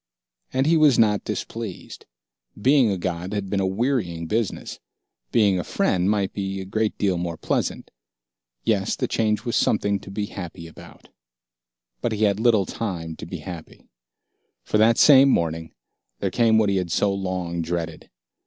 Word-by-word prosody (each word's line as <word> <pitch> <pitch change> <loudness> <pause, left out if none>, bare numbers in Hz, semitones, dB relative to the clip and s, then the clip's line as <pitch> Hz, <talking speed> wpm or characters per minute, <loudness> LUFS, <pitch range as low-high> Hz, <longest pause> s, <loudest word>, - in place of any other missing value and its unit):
And 130 +1 +1
he 165 +2 +4
was 150 -5 +5
not 105 -2 +3
displeased. 110 -5 -6 0.5
Being 130 +1 +4
a 95 - -1
god 90 +1 -4
had 100 -2 -3
been 100 - +1
a 95 - +1
wearying 95 -6 -1
business. 110 +4 -3 0.5
Being 100 -5 +3
a - - -2
friend 90 +1 0
might 100 -2 0
be 95 -1 -3
a 95 - -6
great 110 +3 -1
deal 95 -4 0
more 85 -2 -4
pleasant. - - -2 0.7
Yes, 100 -2 +1
the - - -2
change 110 0 0
was 120 - -1
something 100 -2 +1
to 95 - -12
be 105 +1 -3
happy 90 -4 -8
about. 80 - -14 0.9
But 120 - -1
he 110 0 -1
had 100 -1 +2
little 110 -4 +3
time 85 -8 -4
to - - -8
be - - -7
happy. 85 -4 -10 0.7
For 105 - 0
that 115 +1 +5
same 140 -2 +7
morning, 80 -6 0 0.5
there - - -2
came 115 -2 +3
what 110 -2 +3
he 100 - +1
had 90 -2 -2
so 100 +2 +2
long 90 -3 -3
dreaded. 85 -1 -4
100 Hz, 170 wpm, -23 LUFS, 90-110 Hz, 0.9 s, same